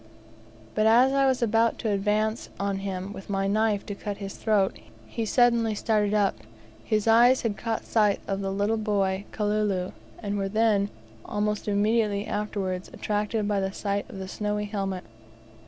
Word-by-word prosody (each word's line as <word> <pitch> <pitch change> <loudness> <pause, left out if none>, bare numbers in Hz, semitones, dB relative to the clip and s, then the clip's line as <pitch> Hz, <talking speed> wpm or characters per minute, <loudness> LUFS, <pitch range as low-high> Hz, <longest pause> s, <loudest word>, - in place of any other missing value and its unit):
But 215 0 +2
as 245 +4 +5
I 275 0 +4
was 260 -2 +1
about 225 0 +2
to 220 - -1
advance 210 +3 0
on 200 0 -1
him 195 0 -4
with 195 - -10
my 195 -1 0
knife 210 0 +1
to 205 - -4
cut 200 0 -5
his 195 -1 -6
throat, 205 -3 +1 0.3
he 230 -2 -4
suddenly 235 -2 +3
started 210 -1 +1
up; 205 -2 +2 0.5
his 215 - 0
eyes 240 +3 +6
had 220 -3 0
caught 225 +1 -3
sight 210 -3 +2
of 195 0 -2
the 195 - -2
little 205 +3 0
boy 200 -2 0
Kalulu, 210 -3 0 0.3
and 205 -2 -3
were 195 0 -1
then, 210 -1 +2 0.3
almost 210 0 -2
immediately 210 0 +1
afterwards, 195 -3 -3
attracted 210 0 -1
by 205 -1 +1
the 190 0 -1
sight 200 0 -3
of - - -9
the 190 0 -5
snowy 210 +1 -2
helmet. 195 -3 -3
210 Hz, 170 wpm, -26 LUFS, 200-220 Hz, 0.5 s, eyes